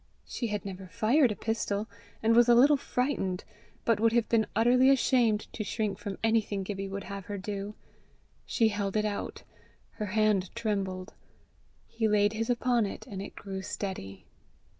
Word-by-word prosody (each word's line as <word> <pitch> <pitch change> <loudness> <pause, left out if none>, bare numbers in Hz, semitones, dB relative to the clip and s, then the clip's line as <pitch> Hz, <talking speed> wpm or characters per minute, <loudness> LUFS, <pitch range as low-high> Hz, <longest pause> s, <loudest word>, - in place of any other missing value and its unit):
She 235 - -3
had 210 -2 -3
never 190 -1 -7
fired 240 - +3
a - - -3
pistol, 215 -1 -2 0.4
and 225 +1 +4
was 240 0 +6
a 240 - +7
little 280 +5 +7
frightened, 250 -9 -1 0.4
but 230 -3 +3
would 225 +1 +3
have 235 -1 +2
been 225 -2 +2
utterly 250 +4 +5
ashamed 245 -5 +3
to 215 - -3
shrink 210 -1 -2
from 200 -2 -5
anything 220 -3 +1
Gibbie 195 0 -4
would 200 0 -5
have 200 -1 -7
her 205 - -5
do. 200 +1 -5 0.7
She 225 -3 +2
held 205 -1 -2
it 215 - +1
out. 205 -1 -4 0.6
Her 210 - -2
hand 210 -2 +2
trembled. 195 -5 -2 0.7
He 225 -1 -1
laid 205 0 +3
his 225 +2 -2
upon 240 -2 +2
it, - - -8
and 195 -2 -6
it 200 - -8
grew 195 -1 -6
steady. 95 - -5
210 Hz, 170 wpm, -29 LUFS, 195-230 Hz, 0.7 s, a